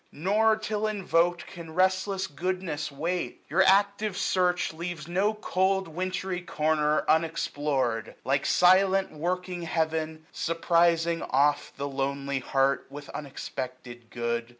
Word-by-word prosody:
Nor, 210 +7 +2
till 215 0 -2
invoked. 175 -4 +1
Can 165 -3 -10
restless 190 +1 +1
goodness 175 -2 -3
wait; 165 -1 -3
your 175 +7 +3
ac^ve 200 +1 +3
search 180 -2 +1
88a 160 - -16
Leaves 170 -3 -5
no 195 +5 +1
cold 190 -2 0
wintry 185 +2 -3
corner 155 -2 +1
unexplored; 145 -7 0
Like 140 +1 +1
silent 190 +1 +4
working 180 +3 -3
Heaven, 160 -1 -2
surprizing 170 0 +2
oft 145 +2 +1
The 140 +1 -3
lonely 140 0 -2
heart 135 +1 +1
with 145 +1 -9
unexpected 125 -4 -7
good. 120 0 -2
165 Hz, 120 wpm, -27 LUFS, 145-185 Hz, -, silent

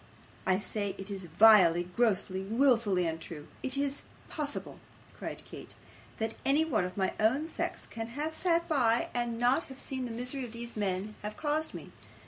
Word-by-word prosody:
I 185 -1 +4
say 205 0 -3
it 195 +1 -6
IS 195 -2 -2
vilely, 175 -1 +6
grossly, 195 -5 +2
wilfully 225 -4 +2
untrue. 160 -2 -5
Is 265 +1 -2
it 280 0 -1 0.3
possible!' 290 -2 -3 0.4
cried - - -5
Kate, - - -10 0.4
'that 220 0 -2
anyone 295 - +2
of 180 +1 -7
my 190 -1 +1
own 255 +8 +3
sex 325 - -3
can 225 0 -6
have 295 +7 -3
sat 340 0 +2
by, 240 -7 +2
and 240 -1 -1
not 245 +7 +3
have 265 0 -11
seen 260 -1 -2
the 240 - -5
misery 250 +3 -2
these 235 +1 -5
men 200 0 -1
have 210 0 -6
caused 310 +1 -1
me? - - -9
230 Hz, 165 wpm, -31 LUFS, 195-275 Hz, 0.4 s, vilely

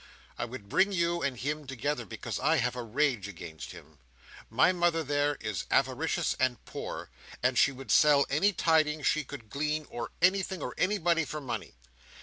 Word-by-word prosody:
I - - -3
would 120 -4 -9
bring 190 - +3
you 170 -2 +1
and 135 -3 -1
him 145 +3 -3
together, 135 -2 -2
because - - -5
I - - +3
have 125 0 0
a 125 - -3
rage 120 -3 0
against 80 -5 -8
him. 75 -1 -14 0.5
My - - +4
mother 175 -2 +1
there, 145 0 +1
is 105 -5 -3
avaricious - - +1
and 130 -2 +2
poor; - - -6 0.3
and 125 +1 +3
she 140 - +5
would 135 0 -7
sell 145 -2 +6
any 160 +9 +3
tidings 155 -4 +2
she 155 - +2
could 125 -6 -10
glean, 150 +3 -1
or 120 -1 -4
anything, 190 +1 +2
or - - -4
anybody, 175 -4 +2
for 150 +1 -5
money. 120 - -5
145 Hz, 175 wpm, -30 LUFS, 125-165 Hz, 0.5 s, sell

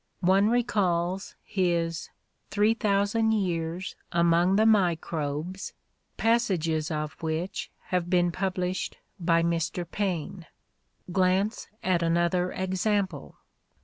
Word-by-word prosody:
One 195 +3 +5
recalls 190 -6 0
his 170 -3 -1 0.4
"3000 210 +1 +2
Years 175 -3 -2 0.2
Among 170 +2 +3
the 215 +2 +4
Microbes," 170 -3 0 0.4
passages 180 -10 +1
of 150 -1 -3
which 160 +3 -3 0.2
have 180 -1 0
been 175 -1 +3
published 185 0 -2 0.2
by 165 -1 +3
Mr. 170 +1 -1
Paine. 180 -2 -3 0.6
Glance 190 +4 +1 0.2
at 180 -2 +2
another 170 +2 +1
ex 190 +2 -2
ample. 195 -8 -1
180 Hz, 95 wpm, -27 LUFS, 170-195 Hz, 0.6 s, One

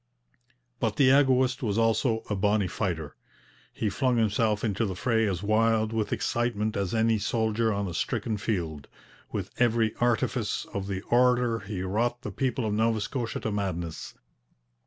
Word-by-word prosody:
But - - 0
the 130 -2 +5
egoist 130 -2 +3
was 105 -4 -1
also 115 0 +2
'a 105 - -1
bonny 100 +1 +2
fighter.' 85 -7 -3 0.6
He 110 - -2
flung 125 +5 +1
himself 110 -1 +1
into 110 -1 0
the 95 -4 -2
fray 115 +2 +1
as 95 -1 -2
wild 110 +1 +2
with 110 -2 -1
excitement 115 -2 -1
as 100 +2 -1
any 110 -1 +2
soldier 110 +1 0
on 100 -1 -1
a 90 - -5
stricken 110 +6 -2
field. 85 -9 -3 0.4
With - - -4
every 115 -2 +2
artifice 120 -2 0
of 100 -1 -3
the 95 -1 -3
orator 125 -1 +3
he 100 -2 -5
wrought 120 +6 -1
the 105 - -4
people 130 +1 -1
of 105 - -1
Nova 110 +1 +2
Scotia 115 +2 -3
to 110 - -2
madness. 90 -5 -4
110 Hz, 160 wpm, -27 LUFS, 100-120 Hz, 0.6 s, the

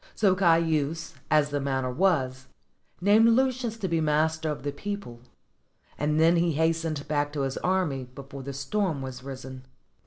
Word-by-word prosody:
So 200 -4 +3
Caius, 165 -3 +1 0.2
as 150 -1 +3
the 145 - 0
manner 130 -2 -1
was, 130 -5 0 0.5
named 210 +4 +5
Lucius 250 -1 +1
to 205 -4 -2
be 165 -2 0
master 155 +1 +1
of 145 -4 -4
the 145 - -2
people; 200 -11 -6 0.8
and 150 +1 0
then 165 +2 +5
he 170 -1 +2
hastened 160 -1 0
back 145 -1 0
to 145 - -2
his 135 -1 -2
army 180 -8 0
before 135 +2 -10
the 135 - -7
stm 140 +4 -2
was 130 -1 -6
risen. 130 -1 -8
155 Hz, 160 wpm, -27 LUFS, 135-175 Hz, 0.8 s, named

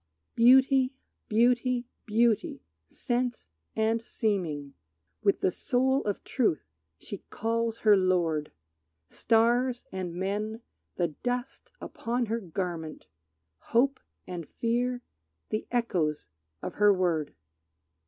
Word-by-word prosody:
Beauty, 260 +2 +5 0.3
beauty, 245 +2 +2 0.2
beauty, 225 0 +1 0.2
sense 245 - -2 0.3
and 220 +1 +1
seeming, 175 -12 -2 0.5
With 200 -2 +2
the 185 - +2
soul 265 +6 +1
of 205 -2 -2
truth 220 - 0 0.3
she 200 - -8
calls 230 0 -1
her 210 -1 +8
lord! 175 -5 +1 0.6
Stars 240 +2 +2
and 180 -2 -4
men 210 +5 -2 0.3
the 175 -2 0
dust 245 - -4
upon 240 +1 -2
her 230 +1 -1
garment; 170 -4 -5 0.7
Hope 265 +3 +4 0.3
and 175 -4 -7
fear 245 +1 -1 0.5
the 215 - -3
echoes 180 -11 -1 0.3
of - - -4
her 205 0 +7
word. 170 -6 0
225 Hz, 105 wpm, -28 LUFS, 185-245 Hz, 0.7 s, her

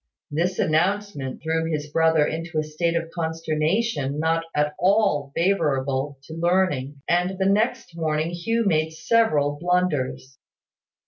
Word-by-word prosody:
This 175 +5 0
announcement 160 -4 0
threw 160 0 0
his 150 -1 -2
brother 160 -1 +3
into 165 +1 -4
a 155 - +2
state 165 +2 -1
of 165 0 -2
consternation 160 0 -1
not 165 +1 +1
at 150 0 +1
all 185 -7 +2
favourable 140 -6 0
to 160 - -10
learning; 165 -5 0
and 180 +2 +1
the 190 - 0
next 215 0 +1
morning 160 0 -1
Hugh 225 +7 -1
made 160 -4 +1
several 155 -8 +2
blunders. 165 -7 -1
160 Hz, 130 wpm, -24 LUFS, 150-180 Hz, -, brother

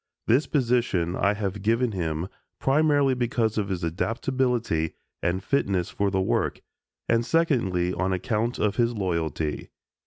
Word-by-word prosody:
This 130 +7 +3
position 120 - +1
I 100 +1 +2
have 100 -1 -3
given 115 +3 +2
him 85 -3 -2 0.3
primarily 145 -1 +3
because 120 -3 0
of 100 -1 -2
his 90 -2 -3
adaptability 115 -1 -1 0.3
and 95 +2 -1
fitness 100 -10 0
for 100 0 0
the 95 0 0
work 95 - 0 0.5
and 115 0 +3
secondly 115 - +1
on 95 +2 -1
account 105 +6 -1
of 105 -1 0
his 120 -1 +2
loyalty. 80 -6 -2
105 Hz, 135 wpm, -26 LUFS, 90-120 Hz, 0.5 s, This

